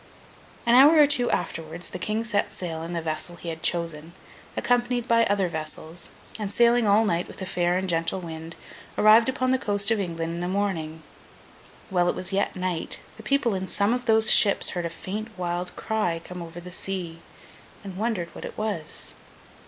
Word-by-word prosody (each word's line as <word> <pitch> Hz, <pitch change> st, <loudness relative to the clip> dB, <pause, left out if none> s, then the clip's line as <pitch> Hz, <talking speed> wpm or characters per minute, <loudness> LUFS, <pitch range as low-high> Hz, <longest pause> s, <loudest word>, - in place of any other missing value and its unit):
An 235 Hz, -, +4 dB
hour 285 Hz, +6 st, +8 dB
or 300 Hz, -, +8 dB
two 265 Hz, -4 st, +2 dB
afterwards, 165 Hz, +2 st, -3 dB
the 185 Hz, -, -6 dB
King 215 Hz, +5 st, -1 dB
set 210 Hz, -3 st, 0 dB
sail 165 Hz, -3 st, -5 dB
in 165 Hz, +1 st, -5 dB
the 170 Hz, -1 st, -2 dB
vessel 160 Hz, +2 st, -4 dB
he 170 Hz, 0 st, -7 dB
had 160 Hz, -1 st, -6 dB
chosen, 165 Hz, -1 st, 0 dB, 0.4 s
accompanied 245 Hz, 0 st, +1 dB
by 230 Hz, 0 st, +4 dB
other 200 Hz, -2 st, +1 dB
vessels, 160 Hz, +1 st, -3 dB, 0.3 s
and, 205 Hz, -2 st, -3 dB
sailing 235 Hz, +1 st, +4 dB
all 210 Hz, +2 st, +5 dB
night 175 Hz, -3 st, 0 dB
with -, -, -11 dB
a 190 Hz, -, -4 dB
fair 175 Hz, -1 st, +1 dB
and 190 Hz, 0 st, -2 dB
gentle 165 Hz, +1 st, 0 dB
wind, 165 Hz, -1 st, -8 dB, 0.4 s
arrived 220 Hz, +3 st, +6 dB
upon 255 Hz, 0 st, 0 dB
the 260 Hz, -, +2 dB
coast 205 Hz, 0 st, +2 dB
of 225 Hz, -, +2 dB
England 165 Hz, -3 st, -3 dB
in 170 Hz, -, -4 dB
the 175 Hz, -, -2 dB
morning. 170 Hz, -5 st, -2 dB, 0.9 s
While 175 Hz, -1 st, +3 dB
it -, -, 0 dB
was 185 Hz, +1 st, -4 dB
yet 195 Hz, -, 0 dB
night, 180 Hz, -3 st, -3 dB, 0.2 s
the -, -, -10 dB
people 240 Hz, 0 st, +1 dB
in 190 Hz, 0 st, -3 dB
some 205 Hz, +4 st, +1 dB
of 245 Hz, 0 st, -2 dB
those 220 Hz, -1 st, +4 dB
ships 200 Hz, -, +5 dB
heard 175 Hz, -2 st, -2 dB
a -, -, -6 dB
faint 215 Hz, +6 st, -6 dB
wild 180 Hz, 0 st, -3 dB
cry 210 Hz, -7 st, -1 dB
come 180 Hz, -1 st, -8 dB
over 170 Hz, 0 st, -8 dB
the 180 Hz, +1 st, -10 dB
sea, 180 Hz, -3 st, -4 dB, 0.6 s
and 195 Hz, -2 st, -8 dB
wondered 200 Hz, -5 st, -2 dB
what -, -, -9 dB
it -, -, -8 dB
was. 205 Hz, -8 st, -3 dB
185 Hz, 195 wpm, -25 LUFS, 170-220 Hz, 0.9 s, hour